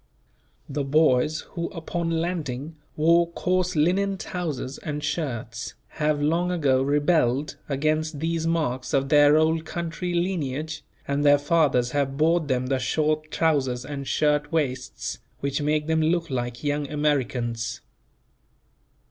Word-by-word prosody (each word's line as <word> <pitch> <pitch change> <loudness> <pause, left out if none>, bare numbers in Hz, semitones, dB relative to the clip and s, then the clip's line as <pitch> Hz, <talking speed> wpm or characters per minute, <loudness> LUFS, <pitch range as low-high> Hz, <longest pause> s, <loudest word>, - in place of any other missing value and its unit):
The 145 0 -2
boys 150 0 +3
who 170 -1 -3
upon 170 0 -3
landing 160 -4 -2 0.2
wore 170 +2 +4
coarse 180 0 0
linen 190 +6 +2
trousers 155 -8 -4
and 150 -1 -4
shirts 120 -7 -3 0.2
have 150 -1 +2
long 165 +4 +1
ago 140 -7 +2
rebelled 145 -1 +1
against 155 +2 0
these 165 +1 -1
marks 140 -7 0
of 135 0 +1
their 145 0 +6
Old 160 +1 +2
Country 170 +2 -4
lineage, 155 -4 -2 0.2
and 140 +1 0
their 145 0 +6
fathers 145 -5 +2
have 140 -1 -1
bought 160 +1 +2
them 130 -2 0
the 130 0 0
short 155 +3 0
trousers 135 -6 +1
and 140 -2 -5
shirt 150 -1 +1
waists, 130 -6 -2 0.2
which 140 +1 -1
make 150 +1 +1
them 160 0 +1
look 165 0 +1
like 120 -1 -3
young 145 -1 -1
Americans. 125 -6 -1
150 Hz, 130 wpm, -25 LUFS, 135-165 Hz, 0.2 s, their